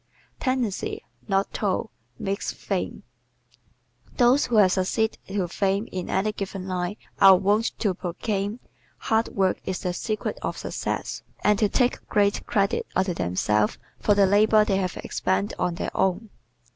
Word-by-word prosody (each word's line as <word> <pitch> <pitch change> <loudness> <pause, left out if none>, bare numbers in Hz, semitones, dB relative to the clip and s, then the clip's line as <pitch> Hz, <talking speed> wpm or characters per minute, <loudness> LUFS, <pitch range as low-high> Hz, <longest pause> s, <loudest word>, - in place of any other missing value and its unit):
Tendency, 255 -7 -1 0.2
Not 195 0 0
Toil, 205 +2 -1 0.3
Makes 195 +5 -2
Fame 190 -3 -3 1.1
¶ - - -23
Those 250 +4 +4
who 240 - -1
have 200 -4 +6
succeeded 200 +4 0
to 195 -2 -1
fame 195 +4 0
in 185 -1 -4
any 200 +3 +1
given 195 -2 -5
line 180 +1 -2 0.2
are 195 -1 +9
wont 205 +5 +1
to 205 -4 +1
proclaim, 200 +4 -3 0.4
"Hard 225 +1 +1
work 190 -2 0
is 185 - -3
the 180 - -1
secret 215 +4 -3
of - - -3
success," - - -3 0.2
and 210 -1 +3
to 210 - +3
take 250 +2 0
great 205 -1 +2
credit 200 -1 +1
unto 185 -1 +1
themselves 105 - +1 0.2
for 205 - +3
the 200 -1 +5
labor 210 +2 +5
they 195 -2 +1
have 185 -2 -2
expended 195 +2 -1
on 175 - 0
their - - -4
own. 190 +3 0
195 Hz, 155 wpm, -25 LUFS, 185-215 Hz, 1.1 s, are